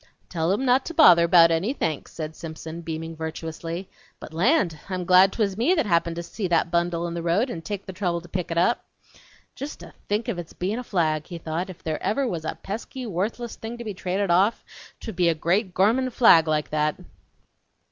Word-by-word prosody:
"Tell 165 0 0
em 210 +7 0
not 255 +1 +4
to 335 - -6
bother 170 - +7
bout 170 -1 +7
any 180 +10 0
thanks," 155 - -3
said 160 -1 -6
Simpson, 160 0 -7
beaming 165 0 -5
virtuously. 165 +2 -5 0.3
"But - - -10
land! 175 - +2
I'm 185 -2 -3
glad 185 +2 +6
twas 200 -3 -1
me 250 - +2
that 315 - +1
happened 170 -3 +1
to 170 - -4
see 195 +3 -4
that 170 -1 +1
bundle 170 -1 0
in 170 - -4
the 170 - -3
road 185 +10 +1
and 165 - -6
take 200 +3 -5
the 190 - -7
trouble 180 -2 -1
to 175 - -13
pick 180 0 -4
it 165 - -3
up." 180 +8 +2 0.7
("Jest 280 +3 -7
to - - -12 0.2
think 210 +3 0
of 200 -7 -2
it's 170 - -8
bein' 200 +6 -2
a - - -5
flag!" 155 -8 0
he 175 - -6
thought; 165 +3 -4
"if 185 - -12
ever 160 +5 -1
there 270 - +1
was 170 -7 -4
a - - -3
pesky, 235 +5 -6
wuthless 220 +4 -3
thing 225 +2 -7
to 225 -3 -5
trade 190 +2 -2
off, 195 +6 +2 0.3
twould 220 - -7
be 175 -2 +4
a 165 - +1
great, 185 +6 0
gormin' 235 +7 +3
flag 225 -10 +6
like 155 -1 0
that!") 155 0 +1
175 Hz, 215 wpm, -24 LUFS, 165-210 Hz, 0.7 s, bother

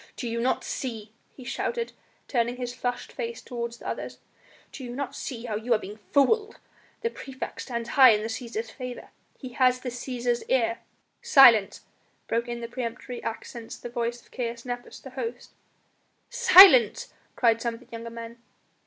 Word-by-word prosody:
"Do 245 - -5
ye 230 0 -3
not 250 +2 0
see," 225 -5 -5 0.2
he 260 - -11
shouted, 465 - -3 0.4
turning 240 -1 0
his 245 -1 -4
flushed 245 0 -4
face 465 -1 -5
toward 235 -2 -5
the 235 - -10
others, - - -5 0.5
"do 270 - -9
you 240 -1 -6
not 280 -1 -4
see 240 -2 -6
how 220 -3 -3
you 230 +3 +1
are - - +2
being 210 +1 -9
fooled? 420 +10 +2 0.4
The 465 0 -1
praefect 270 - -7
stands 235 -2 -4
high 260 0 +8
in 210 -2 +3
the - - -2
Cæsar's 230 -1 -5
favour, 250 -1 -8 0.3
he 260 - -8
has 255 0 +2
the 255 - -4
Cæsar's 245 -1 -2
ear 235 -3 +1 0.3
" - - -47 0.2
"Silence!" 230 -7 +8 0.5
broke 235 +1 -1
in 235 0 -5
in 230 - -6
peremptory 245 0 -5
accents 230 0 -6
the 240 - -8
voice 240 0 -3
of - - -26
Caius 235 -1 -4
Nepos, 245 0 -6
the 265 - -11
host. 245 -2 -6 0.8
"Silence!" 375 - +7 0.2
cried 230 -2 +3
some 235 -1 -2
of - - -13
the 250 - -20
younger 230 0 -6
men. 230 0 -9
240 Hz, 180 wpm, -26 LUFS, 230-255 Hz, 0.8 s, high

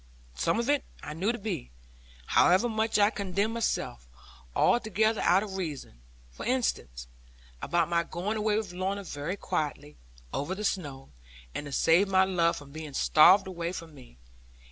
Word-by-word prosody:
Some 65 - 0
of 235 - -1
it 285 -1 +2 0.2
I 150 - -6
knew 190 +8 0
to 240 - -4
be 200 - -4 0.6
(however 185 - +4
much 220 -1 0
I 205 +1 +4
condemned 200 +1 -1
myself) 210 - -2 0.5
altogether 220 -1 +2
out 185 +4 +4
of 195 -3 -6
reason; 145 - -6 0.3
for - - -9
instance, 225 - -1 0.6
about 170 -2 +1
my 170 0 +2
going 180 +6 -3
away 210 0 +1
with 205 -5 -4
Lorna 190 +2 -2
very 165 +2 -4
quietly, 145 - -3 0.4
over 165 +7 -2
the 210 - -6
snow, 145 -9 -3 0.4
and 145 - -5
to - - -8
save 165 +7 +4
my 190 -1 +4
love 170 -3 +1
from 145 -1 -11
being 155 -2 -8
starved 180 +9 +6
away 170 -2 -4
from 165 -3 -8
me. 125 - -16
185 Hz, 165 wpm, -28 LUFS, 155-210 Hz, 0.6 s, starved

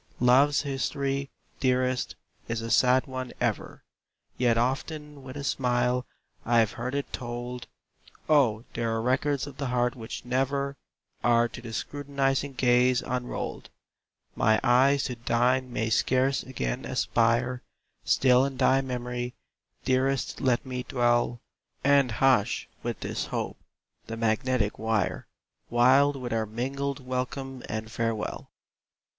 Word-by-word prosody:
Love's 135 +4 +4
history, 140 0 -2 0.3
dearest, 130 -1 +1 0.3
is 115 0 -2
a 115 0 -4
sad 125 +3 +4
one 130 -2 -5
ever, - - -2 0.5
Yet 120 -2 +2
often 145 +4 -2
with 130 +1 -9
a 140 - -5
smile 125 -1 0 0.4
I've 115 -2 +3
heard 125 +4 -4
it 140 - -3
told! 120 0 -5 0.6
Oh, 125 -8 +3
there 115 0 -1
are - - 0
records 130 +4 +1
of 145 -2 -10
the 140 - -2
heart 125 0 +1
which 115 0 -7
never 140 +2 0 0.5
Are 120 0 +4
to 120 - -9
the 115 -1 -8
scrutinizing 140 +1 -1
gaze 125 0 +3
unrolled! 125 0 -4 0.7
My 110 0 +3
eyes 130 +2 +4
to 125 - -2
thine 125 +2 +2
may 110 -1 -1
scarce 130 +3 +2
again 65 - -3
aspire 120 +2 +1 0.4
Still 125 -1 +4
in 135 -1 -2
thy 135 +1 +4
memory, 125 -1 -4 0.5
dearest 130 +1 0
let 130 -2 +1
me 125 -1 -4
dwell, 120 -1 +1 0.4
And 140 -2 +4
hush, 125 -2 +2
with - - -4
this - - -3
hope, - - -4 0.5
the 115 - -5
magnetic 115 0 0
wire, 110 -3 -1 0.4
Wild 130 +4 +5
with 125 -3 -4
our 110 -1 0
mingled 135 +4 -3
welcome 130 +1 -4
and 110 +1 -4
farewell! 115 -1 -3
125 Hz, 130 wpm, -27 LUFS, 120-135 Hz, 0.7 s, Wild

